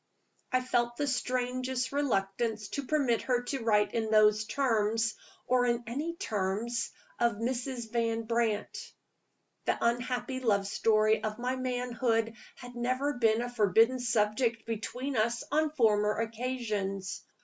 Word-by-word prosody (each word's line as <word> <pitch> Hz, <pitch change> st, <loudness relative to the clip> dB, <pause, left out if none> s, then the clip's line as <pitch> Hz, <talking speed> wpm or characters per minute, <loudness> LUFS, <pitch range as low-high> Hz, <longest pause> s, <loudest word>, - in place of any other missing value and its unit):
I 255 Hz, -1 st, +3 dB
felt 240 Hz, -1 st, 0 dB
the 290 Hz, -, 0 dB
strangest 255 Hz, -1 st, -1 dB
reluctance 220 Hz, -5 st, -1 dB
to 280 Hz, -2 st, -4 dB
permit 270 Hz, -7 st, +2 dB
her 245 Hz, -1 st, 0 dB
to 255 Hz, 0 st, -3 dB
write 210 Hz, -2 st, +3 dB
in 220 Hz, -1 st, -1 dB
those 215 Hz, 0 st, +5 dB
terms, 225 Hz, -3 st, +1 dB, 0.3 s
or 250 Hz, -1 st, +3 dB
in 240 Hz, 0 st, 0 dB
any 295 Hz, +9 st, -3 dB
terms, 220 Hz, -, -2 dB, 0.3 s
of 235 Hz, -1 st, +3 dB
Mrs. 240 Hz, +1 st, -3 dB
Van 230 Hz, -1 st, 0 dB
Brandt. 225 Hz, -2 st, -2 dB, 0.7 s
The -, -, +1 dB
unhappy 245 Hz, +2 st, -1 dB
love 205 Hz, -6 st, +2 dB
story 215 Hz, +2 st, +2 dB
of 215 Hz, -1 st, -2 dB
my 250 Hz, +2 st, -1 dB
manhood 245 Hz, -3 st, 0 dB, 0.2 s
had 245 Hz, 0 st, -11 dB
never 255 Hz, +4 st, 0 dB
been 230 Hz, -2 st, +2 dB
a 245 Hz, -, -4 dB
forbidden 225 Hz, +4 st, +4 dB
subject 230 Hz, 0 st, +1 dB
between 245 Hz, +5 st, -4 dB
us 230 Hz, +2 st, +1 dB
on 310 Hz, +1 st, +2 dB
former 215 Hz, -7 st, +2 dB
occasions. 220 Hz, -4 st, -3 dB
235 Hz, 135 wpm, -30 LUFS, 220-255 Hz, 0.7 s, those